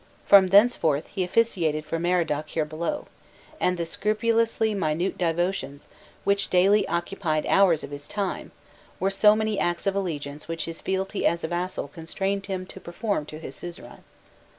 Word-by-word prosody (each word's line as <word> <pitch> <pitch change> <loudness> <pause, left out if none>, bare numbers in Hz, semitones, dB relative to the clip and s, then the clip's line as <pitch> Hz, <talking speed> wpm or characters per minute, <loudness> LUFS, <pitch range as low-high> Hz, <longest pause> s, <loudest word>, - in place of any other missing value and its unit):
From 195 -2 +7
thenceforth, 185 -7 +4
he 190 - 0
officiated 175 -7 +1
for 165 +1 -3
Merodach 165 -4 0
here 155 -2 -1
below, 170 - -3 0.5
and 180 0 +1
the 170 - -2
scrupulously 220 +4 +1
minute 170 -1 -1
devotions, 175 -4 -2 0.4
which 200 0 +1
daily 195 +3 +4
occupied 170 -3 -1
hours 185 -6 +4
of - - -8
his 145 0 -7
time, 200 -2 -3 0.5
were 195 +1 +1
so 210 +2 +5
many 215 -1 -1
acts 175 0 -1
of 195 - +2
allegiance 150 -6 -4
which 165 0 -3
his 165 -1 -7
fealty 190 +1 -2
as 170 0 -1
a - - -1
vassal 175 -2 -3
constrained 195 +6 -3
him 185 -2 -3
to 190 - -11
perform 185 -3 -3
to 155 - -8
his 160 - -8
suzerain. 175 -1 -9
180 Hz, 160 wpm, -25 LUFS, 165-200 Hz, 0.5 s, From